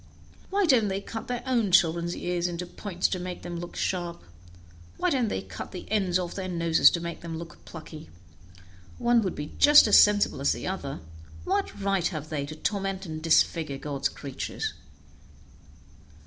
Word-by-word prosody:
Why 400 0 +2
don't 250 -9 +4
they 195 0 -1
cut 225 +2 -7
their 245 -1 -3
own 235 -6 +1
children's 170 -1 +3
ears 175 0 -1
into 175 0 -4
points 180 0 -2
to 185 - -2
make 180 0 -6
them 175 -1 -5
look 175 0 -8
sharp? 175 -2 -2 0.7
Why 360 -1 +1
don't 255 -5 +1
they 205 - -3
cut - - -8
the 180 - -7
end 190 -4 +2
off 180 -2 -3
their 190 -1 -4
noses 170 -2 +4
to 170 - -2
make 170 -1 -6
them 165 -1 -5
look 170 +1 -10
plucky? 160 -1 -10 0.9
One 240 -1 +3
would 190 -4 -2
be 150 +1 -6
just 295 0 +8
as 210 - +7
sensible 205 -8 +4
as 140 - +3
the - - -6
other. 140 - -4 0.4
What 395 - -1
right 195 -3 +1
have 155 -3 -6
they 145 -2 -3
to 155 - -7
torment 195 +2 -2
and 155 -2 -6
disfigure 160 -2 +2
God's 140 -1 -2
creatures?" 140 -3 -5
180 Hz, 175 wpm, -27 LUFS, 165-205 Hz, 0.9 s, just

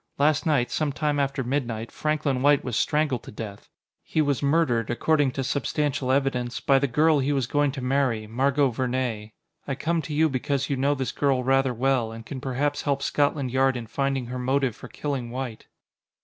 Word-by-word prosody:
Last 150 +2 +2
night, 140 -6 +2
some 155 -2 0
time 145 0 -1
after 140 -1 0
midnight, 120 -4 -2
Franklin 150 -4 -1
White 145 0 +4
was 125 -3 -3
strangled 150 -4 +1
to - - -11
death. 105 -2 -8 0.3
He - - -3
was 145 -3 +1
murdered, 140 -6 +2
according 145 +4 +2
to 135 - -2
substantial 140 0 -1
evidence, 130 -3 0
by 135 -1 +3
the 140 - +1
girl 150 +4 +3
he 140 +2 0
was 135 -3 +1
going 145 +3 +1
to 135 - -5
marry 125 -4 +1
Margot 135 +4 +1
Vernee. 120 -3 -2 0.3
I 135 - -1
come 165 +4 0
to 150 +1 -6
you 160 +2 +4
because 140 0 -1
you - - +2
know 140 +2 +1
this 130 -2 -2
girl 135 -3 +1
rather 135 0 +3
well, 125 -1 +1
and 115 0 -9
can 130 0 -6
perhaps 145 +2 -1
help 140 -1 -1
Scotland 145 -3 0
Yard 130 0 +2
in 120 - -5
finding 135 +2 -1
her 125 +1 -5
motive 130 -2 0
for - - -10
killing 135 -3 -4
White." 125 -2 -6
135 Hz, 195 wpm, -25 LUFS, 125-145 Hz, 0.3 s, White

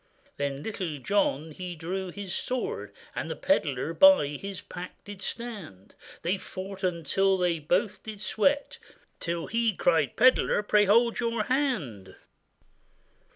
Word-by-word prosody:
Then 140 0 -2
Little 185 -8 -4
John 160 -2 0
he 180 +2 -6
drew 185 +4 -4
his 195 0 -5
sword; 255 -1 -2 0.2
The - - -3
pedlar - - 0
by 285 - +7
his 190 +7 -6
pack 180 0 -8
did 205 -1 -10
stand; 200 - -6 0.3
They 185 +3 0
fought 195 +1 -8
until 185 +2 +1
they 175 -2 +1
both 185 +7 0
did 215 -2 -8
sweat, 280 +7 +1 0.4
Till 170 -1 -2
he 230 -2 +1
cried, 160 -6 +2
'Pedlar, 255 -4 +4
pray 210 0 +4
hold 230 +4 +4
your 230 -2 0
hand! 185 - -1
190 Hz, 130 wpm, -28 LUFS, 165-220 Hz, 0.4 s, by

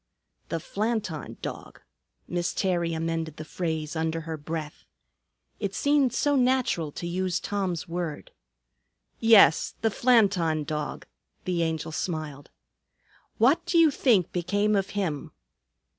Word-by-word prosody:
"The 165 - -2
Flanton 205 - -3
Dog." - - -7 0.5
Miss 175 0 -2
Terry 175 -3 0
amended 165 -1 -3
the 155 - -7
phrase 160 -2 -3
under 160 0 -1
her 160 0 -5
breath. 155 0 -6 0.7
It 200 -2 -3
seemed 285 -3 +3
so 290 +3 +1
natural 250 - +1
to - - -6
use 180 +1 -1
Tom's 190 -5 -2
word. 170 -3 -4 0.9
"Yes, 225 -7 +6
the 225 - +2
Flanton 195 -11 +3
Dog," 150 0 -4 0.4
the 180 -2 0
Angel 160 -1 -2
smiled. 155 -4 -4 0.9
"What 260 +8 +4
do 345 - +2
you 325 -2 +6
think 225 - +2
became 205 +4 +1
of 195 0 0
him?" 160 -8 -2
175 Hz, 125 wpm, -27 LUFS, 160-210 Hz, 0.9 s, Yes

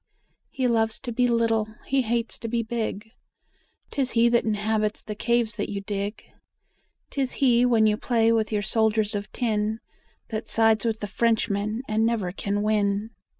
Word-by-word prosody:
He 260 - -2
loves 225 -2 +1
to 245 - -5
be 245 +1 +2
little, 225 -2 +1
he 275 0 +2
hates 235 0 -2
to 230 - -5
be 230 +1 -1
big, 220 -2 -4 0.8
'Tis 270 -3 -1
he 235 0 +4
that 235 0 +3
inhabits 215 0 0
the 210 - -5
caves 235 +1 +1
that - - -2
you 200 - -3
dig; 200 +1 -4 0.9
'Tis 270 -2 -1
he 245 -2 +3
when 230 -3 +4
you 210 -1 +3
play 230 -1 +2
with 225 -1 +1
your 210 -1 0
soldiers 220 0 +1
of 205 0 -4
tin 220 -2 -1 0.5
That 220 -1 -4
sides 225 0 +3
with 220 -1 -1
the 205 - -3
Frenchmen 220 0 0
and 220 +1 +1
never 225 -6 0
can 200 +2 -2
win. 210 0 0
220 Hz, 170 wpm, -25 LUFS, 210-235 Hz, 0.9 s, he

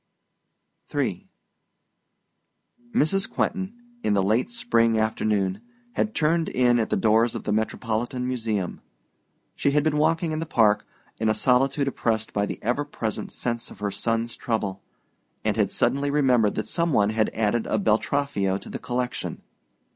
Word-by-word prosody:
III - - -1 1.6
Mrs. 195 -3 +2
Quentin, 195 +1 -2 0.3
in 105 - +1
the 100 - +3
late 110 - +2
spring 115 - +2
afternoon, 105 -3 0 0.3
had 215 - -1
turned 160 +1 +2
in 120 -1 +3
at 110 - 0
the - - +1
doors 110 +2 +3
of - - -4
the - - -2
Metropolitan 115 +3 -1
Museum. 110 -7 -2 0.7
She - - +1
had 145 +1 +2
been 155 -1 +1
walking 160 +2 +2
in 155 - -2
the 165 - -4
Park, 110 -7 +3 0.3
in 110 0 +2
a 110 - +2
solitude 135 +3 +2
oppressed 110 -4 -1
by 100 0 +1
the - - -4
ever 125 +6 +1
present 115 -7 -4
sense 120 -1 -3
of - - -12
her 100 0 -2
son's 115 +3 -1
trouble, 100 -4 -2 0.6
and - - +2
had - - +2
suddenly 140 +1 +1
remembered 130 -7 +3
that - - -2
some 170 -2 0
one 105 -2 +3
had 110 -1 +1
added 110 +1 +1
a - - +1
Beltraffio 105 -1 +1
to - - -11
the - - -5
collection. 125 0 -3
115 Hz, 155 wpm, -25 LUFS, 110-145 Hz, 1.6 s, the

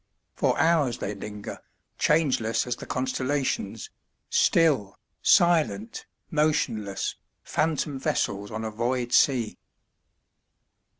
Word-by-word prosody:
For - - +1
hours 145 -6 +3
they 100 - -3
linger, 105 0 -7 0.4
changeless 135 -8 +2
as 125 -1 -2
the - - -9
constellations, 130 +2 -2 0.4
still, 140 - +3 0.2
silent, 120 - +2 0.2
motionless, 115 -10 0 0.3
phantom 150 -3 -1
vessels 100 -5 -1
on 110 +1 -4
a 110 - -3
void 120 +2 -1
sea. 120 -6 +3
125 Hz, 95 wpm, -26 LUFS, 110-150 Hz, 0.4 s, hours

